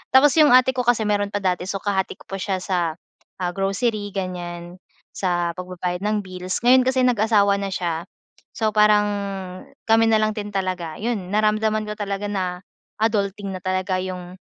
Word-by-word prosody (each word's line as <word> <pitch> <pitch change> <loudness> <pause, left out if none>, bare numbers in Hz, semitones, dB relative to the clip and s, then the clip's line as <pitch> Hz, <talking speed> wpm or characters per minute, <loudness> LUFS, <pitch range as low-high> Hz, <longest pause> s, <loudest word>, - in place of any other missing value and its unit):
Tapos 280 +2 +7
yung 295 -5 +7
ate 255 +1 +5
ko 255 - -1
kasi 235 -2 +3
meron 205 -1 +1
pa 205 0 -4
dati, 180 -1 0
so, 195 - -3
kahati 195 -1 -1
ko - - -18
pa 195 0 -6
siya 190 -1 -2
sa, 175 -4 -1 0.4
ah, 180 -1 -2
grocery, 205 +2 -1
ganiyan, 175 -1 -5 0.4
sa 175 -2 0
pagbabayad 180 -1 -4
ng 215 0 +1
bills, 185 0 -4
ngayon 255 +1 +6
kasi 260 0 +2
nag-asawa 210 -4 +3
na 200 - -2
siya. 170 -2 -2 0.5
So, 220 -1 +2
parang 210 -1 +5 0.8
kami 225 0 +5
nalang 215 -1 +3
din 210 -1 -5
talaga, 185 -5 -3
yun 210 -5 -3
naramdaman 215 +1 +1
ko - - -2
talaga 200 -1 -3
na 185 -3 -2 0.4
adulting 205 -2 0
na 185 - -6
talaga, 185 0 -1
yung 185 -1 -6
200 Hz, 170 wpm, -22 LUFS, 185-215 Hz, 0.8 s, Tapos